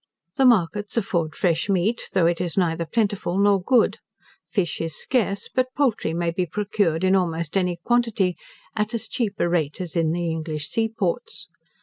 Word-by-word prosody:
The 265 Hz, -, +5 dB
markets 205 Hz, -1 st, +2 dB
afford 170 Hz, -7 st, 0 dB
fresh 170 Hz, +1 st, 0 dB
meat, 200 Hz, +5 st, 0 dB
though 185 Hz, -3 st, +3 dB
it 170 Hz, 0 st, +1 dB
is 175 Hz, -1 st, -2 dB
neither 170 Hz, -2 st, +1 dB
plentiful 205 Hz, -4 st, 0 dB
nor 200 Hz, -1 st, +4 dB
good. 245 Hz, +5 st, +3 dB, 0.5 s
Fish 185 Hz, -8 st, -1 dB
is 165 Hz, -2 st, -3 dB
scarce; 205 Hz, -6 st, -1 dB
but 255 Hz, 0 st, -1 dB
poultry 255 Hz, -, +1 dB
may 170 Hz, 0 st, -1 dB
be 180 Hz, +1 st, -1 dB
procured 195 Hz, -3 st, 0 dB
in 190 Hz, +1 st, +4 dB
almost 170 Hz, -3 st, -1 dB
any 180 Hz, -2 st, +1 dB
quantity, 230 Hz, -7 st, +2 dB, 0.4 s
at 215 Hz, +2 st, -1 dB
as 230 Hz, -, -4 dB
cheap 225 Hz, -5 st, -2 dB
a -, -, +1 dB
rate 160 Hz, -4 st, 0 dB
as 180 Hz, -3 st, -5 dB
in 165 Hz, -2 st, +2 dB
the 170 Hz, 0 st, -1 dB
English 155 Hz, -2 st, -3 dB
sea 225 Hz, -1 st, 0 dB
ports. 215 Hz, 0 st, -3 dB
185 Hz, 180 wpm, -23 LUFS, 170-215 Hz, 0.5 s, The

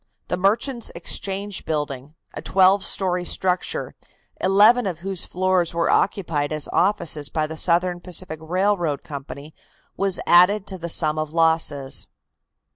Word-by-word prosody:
The -, -, 0 dB
Merchants' 225 Hz, +6 st, 0 dB
Exchange 195 Hz, +3 st, -3 dB
building, 145 Hz, -1 st, -4 dB, 0.2 s
a -, -, -6 dB
twelve 190 Hz, +1 st, +3 dB
story 180 Hz, -2 st, +1 dB
structure, 180 Hz, +1 st, -1 dB, 0.5 s
eleven 210 Hz, +5 st, +5 dB
of 170 Hz, -3 st, -5 dB
whose 190 Hz, -1 st, -2 dB
floors 185 Hz, -2 st, 0 dB
were 170 Hz, -, +1 dB
occupied 160 Hz, -7 st, 0 dB
as 155 Hz, -1 st, -2 dB
offices 170 Hz, -6 st, 0 dB
by 155 Hz, -1 st, -1 dB
the 160 Hz, +1 st, -6 dB
Southern 175 Hz, +2 st, +1 dB
Pacific 175 Hz, -3 st, -3 dB
Railroad 175 Hz, -2 st, 0 dB
Company, 145 Hz, -1 st, -9 dB, 0.4 s
was 195 Hz, -1 st, -1 dB
added 185 Hz, +4 st, +5 dB
to 190 Hz, -2 st, -6 dB
the 170 Hz, 0 st, -5 dB
sum 155 Hz, -1 st, +1 dB
of 155 Hz, 0 st, -4 dB
losses. 160 Hz, -4 st, +1 dB
175 Hz, 135 wpm, -22 LUFS, 155-195 Hz, 0.5 s, eleven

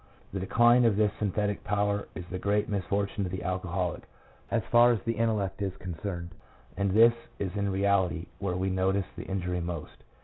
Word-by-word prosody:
The 95 Hz, -, -2 dB
decline 120 Hz, +6 st, +5 dB
of 110 Hz, -3 st, +4 dB
this 105 Hz, -1 st, +3 dB
synthetic 105 Hz, 0 st, -1 dB
power 100 Hz, 0 st, 0 dB
is 90 Hz, -, -6 dB
the 90 Hz, +1 st, -5 dB
great 105 Hz, +2 st, +1 dB
misfortune 100 Hz, 0 st, -1 dB
of 90 Hz, -, -3 dB
the 95 Hz, -, -4 dB
alco 90 Hz, 0 st, -2 dB
holic 90 Hz, -1 st, -1 dB, 0.5 s
as 115 Hz, -2 st, +1 dB
far 120 Hz, +1 st, +7 dB
as 115 Hz, -, +1 dB
the 115 Hz, -, 0 dB
intellect 110 Hz, -3 st, -1 dB
is 95 Hz, -2 st, -2 dB
concerned, 85 Hz, -1 st, -5 dB, 0.4 s
and 100 Hz, +1 st, 0 dB
this 115 Hz, +4 st, +6 dB, 0.2 s
is 95 Hz, -1 st, -3 dB
in 100 Hz, -1 st, 0 dB
reality 95 Hz, -3 st, +1 dB
where 95 Hz, -3 st, -2 dB
we 95 Hz, +1 st, 0 dB
notice 95 Hz, +1 st, +1 dB
the -, -, -7 dB
injury 90 Hz, -2 st, -2 dB
most. 85 Hz, -3 st, -6 dB
100 Hz, 190 wpm, -29 LUFS, 90-105 Hz, 0.5 s, far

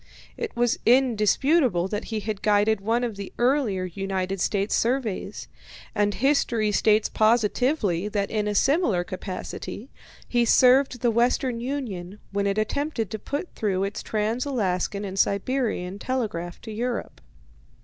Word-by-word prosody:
It 460 Hz, -, -5 dB
was 240 Hz, -1 st, +1 dB
indisputable 245 Hz, -, +3 dB
that 210 Hz, +2 st, -3 dB
he 220 Hz, -2 st, -3 dB
had 210 Hz, -2 st, -4 dB
guided 210 Hz, 0 st, +3 dB
one 230 Hz, +4 st, +1 dB
of 230 Hz, -4 st, -3 dB
the 200 Hz, -1 st, -6 dB
earlier 240 Hz, -7 st, +1 dB
United 190 Hz, +1 st, -3 dB
States 200 Hz, +2 st, 0 dB
surveys, 225 Hz, -5 st, -1 dB, 0.5 s
and 205 Hz, -1 st, +1 dB
history 235 Hz, -5 st, +2 dB
states 215 Hz, +1 st, +3 dB
positively 215 Hz, -, +1 dB
that 205 Hz, -1 st, -2 dB
in 210 Hz, -1 st, 0 dB
a 210 Hz, -, -1 dB
similar 270 Hz, -, +2 dB
capacity 190 Hz, +6 st, -6 dB, 0.4 s
he 240 Hz, -1 st, +2 dB
served 255 Hz, +1 st, +4 dB
the 240 Hz, -2 st, +3 dB
Western 240 Hz, +1 st, +1 dB
Union 225 Hz, -8 st, -4 dB
when 200 Hz, 0 st, 0 dB
it 200 Hz, +1 st, 0 dB
attempted 230 Hz, -, -1 dB
to 220 Hz, -, -4 dB
put 285 Hz, -, -5 dB
through 195 Hz, -3 st, -1 dB
its 200 Hz, +1 st, -3 dB
trans 220 Hz, +3 st, -1 dB
Alaskan 200 Hz, -6 st, -1 dB
and 195 Hz, 0 st, -4 dB
Siberian 200 Hz, -3 st, 0 dB
telegraph 205 Hz, -10 st, -3 dB
to 220 Hz, -, -8 dB
Europe. 235 Hz, +3 st, -4 dB
215 Hz, 140 wpm, -25 LUFS, 200-250 Hz, 0.5 s, served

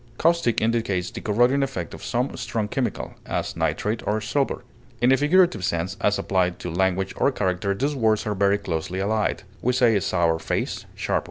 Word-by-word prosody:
Caustic 165 Hz, -8 st, +2 dB
indicates 110 Hz, -5 st, 0 dB
the 115 Hz, -, -7 dB
corroding 120 Hz, +6 st, +3 dB
effect 135 Hz, 0 st, -3 dB
of -, -, -9 dB
some 125 Hz, +2 st, -1 dB
strong 110 Hz, -3 st, -2 dB
chemical, 125 Hz, +4 st, -3 dB
as -, -, -2 dB
nitrate 110 Hz, +2 st, -1 dB
of 110 Hz, +1 st, -1 dB
silver. 135 Hz, +4 st, -1 dB, 0.4 s
In 120 Hz, +2 st, +4 dB
a -, -, +7 dB
figurative 150 Hz, -, +3 dB
sense, 85 Hz, +2 st, -1 dB
as 105 Hz, 0 st, +2 dB
applied 90 Hz, -2 st, 0 dB
to 90 Hz, -, -5 dB
language 95 Hz, +2 st, 0 dB
or -, -, +3 dB
character, 100 Hz, -3 st, -1 dB
these 140 Hz, +8 st, 0 dB
words 110 Hz, -4 st, +1 dB
are 105 Hz, -, 0 dB
very 100 Hz, 0 st, +3 dB
closely 85 Hz, 0 st, -3 dB
allied. 105 Hz, +2 st, 0 dB
110 Hz, 155 wpm, -24 LUFS, 95-125 Hz, 0.4 s, a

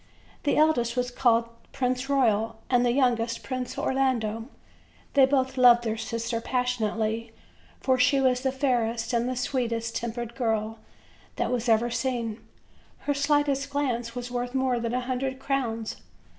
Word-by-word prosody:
The 285 Hz, -, +2 dB
eldest 250 Hz, -6 st, +2 dB
was 250 Hz, 0 st, 0 dB
called 235 Hz, -2 st, +3 dB
the 230 Hz, 0 st, -25 dB
Prince 255 Hz, 0 st, -1 dB
Royal 225 Hz, -5 st, +2 dB, 0.2 s
and 245 Hz, -1 st, +4 dB
the 240 Hz, -, +3 dB
youngest 240 Hz, -3 st, +1 dB
Prince 255 Hz, -2 st, -4 dB
Orlando. 235 Hz, -5 st, 0 dB, 0.7 s
They 270 Hz, -2 st, +6 dB
both 265 Hz, -1 st, 0 dB
loved 240 Hz, -1 st, +7 dB
their 220 Hz, -2 st, -1 dB
sister 230 Hz, +1 st, -3 dB
passion 250 Hz, -3 st, 0 dB
ately, 225 Hz, +1 st, -2 dB, 0.5 s
for 260 Hz, -1 st, +2 dB
she 275 Hz, +2 st, +4 dB
was 255 Hz, -1 st, +2 dB
the 265 Hz, 0 st, 0 dB
fairest 240 Hz, -3 st, 0 dB
and 235 Hz, +1 st, +1 dB
the 255 Hz, -, -2 dB
sweetest 235 Hz, -3 st, -2 dB
tempered 235 Hz, 0 st, -4 dB
girl 225 Hz, -3 st, -1 dB, 0.6 s
that -, -, -1 dB
was 245 Hz, -1 st, -1 dB
ever 230 Hz, +2 st, +3 dB
seen; 235 Hz, -2 st, -2 dB, 0.6 s
her 290 Hz, -, 0 dB
slightest 285 Hz, -1 st, +1 dB
glance 245 Hz, -5 st, -2 dB
was 245 Hz, 0 st, -5 dB
worth 245 Hz, +1 st, -3 dB
more 260 Hz, -2 st, +1 dB
than 235 Hz, +1 st, -2 dB
a 250 Hz, -, 0 dB
hundred 260 Hz, +1 st, -2 dB
crowns. 250 Hz, -5 st, -2 dB
245 Hz, 155 wpm, -27 LUFS, 230-265 Hz, 0.7 s, loved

